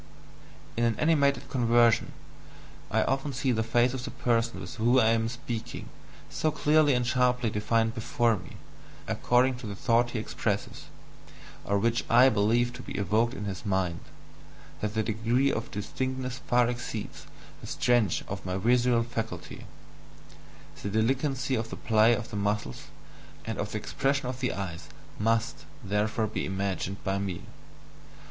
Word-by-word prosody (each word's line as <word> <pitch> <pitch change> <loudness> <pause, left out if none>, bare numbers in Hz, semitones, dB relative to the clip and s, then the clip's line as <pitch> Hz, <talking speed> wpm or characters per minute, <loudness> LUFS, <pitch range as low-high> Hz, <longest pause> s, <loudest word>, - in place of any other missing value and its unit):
In 120 - 0
an 115 -1 +2
animated 145 -2 +2
conversation, 120 -2 +3 0.8
I - - +2
often 135 +2 -1
see 130 +1 0
the 110 -2 +1
face 120 +2 +2
of 130 -2 -4
the 125 - -4
person 115 -4 0
with 90 -3 -8
whom 120 +3 +3
I 110 -3 +5
am 115 0 +2
speaking 115 -1 -6 0.4
so 155 - -1
clearly 150 -2 +3
and 125 0 +1
sharply 125 -2 +2
defined 115 +2 +1
before 115 0 +1
me, 90 -4 -10 0.5
according 125 +1 +2
to 125 - -7
the 100 - -5
thought 120 +3 +2
he 120 - -4
expresses, 110 - -3 0.8
or 100 - +1
which 115 +3 +1
I 125 +3 +7
believe 115 +3 +2
to 125 - -8
be - - -7
evoked 110 +5 +1
in 105 - -5
his 95 -2 -5
mind, 95 -4 0 0.8
that 105 0 -3
the 110 - +1
degree 115 +5 +1
of 115 - -3
distinctness 130 +5 -4
far 120 -1 +4
exceeds 120 -3 -5 0.3
the - - -9
STRENGTH 120 -7 +2
of - - -5
my 95 0 -2
visual 120 +3 +3
faculty 110 -7 -6 1.1
the 100 - -3
delicacy 130 +5 0
of 115 -2 -1
the - - -5
play 110 +1 +4
of 115 +2 -6
the - - -5
muscles 100 -9 -2 0.6
and - - -4
of - - -3
the - - -1
expression 140 0 -1
of 125 0 -4
the 125 - 0
eyes 90 -4 -6 0.3
MUST 115 +1 0 0.2
therefore 105 +2 0
be 110 - -3
imagined 95 0 -3
by 95 +1 0
me. 95 -3 -4
115 Hz, 155 wpm, -28 LUFS, 105-125 Hz, 1.1 s, I